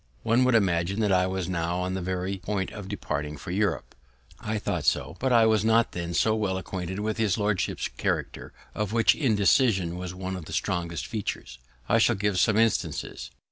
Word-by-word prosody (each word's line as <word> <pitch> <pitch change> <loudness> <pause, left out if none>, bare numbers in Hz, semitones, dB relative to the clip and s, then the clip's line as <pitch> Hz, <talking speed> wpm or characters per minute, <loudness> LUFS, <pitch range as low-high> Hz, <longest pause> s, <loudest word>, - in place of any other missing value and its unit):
One 120 +3 +3
would 130 -2 +3
imagine 95 -1 +1
that 105 -2 +2
I 90 -1 +3
was 95 -1 -3
now 85 -1 -1
on 90 +1 -2
the 95 - -2
very 95 +2 -2
point 95 +1 -3
of 105 -3 -8
departing 75 -7 -4
for 90 +5 -7
Europe. 100 -2 -1 0.5
I 110 +1 -2
thought - - -2
so; 75 +5 0
but 130 0 0
I 115 -2 +6
was 110 -2 +3
not 115 +1 +3
then 85 0 -4
so 110 - +3
well 100 -4 -1
acquainted 95 -1 -5
with 110 +1 -2
his 110 -4 +1
lordship's 105 -3 -1
character, - - -3 0.2
of 105 0 -3
which 115 -1 +5
indecision 105 - +2
was 90 0 -6
one 95 0 -4
of 90 -4 -7
the - - -8
strongest 85 -3 -2
features. 95 - -5 0.3
I - - +3
shall - - +4
give 100 -1 0
some 105 +4 +3
instances. 115 -1 0
95 Hz, 195 wpm, -26 LUFS, 90-110 Hz, 0.5 s, I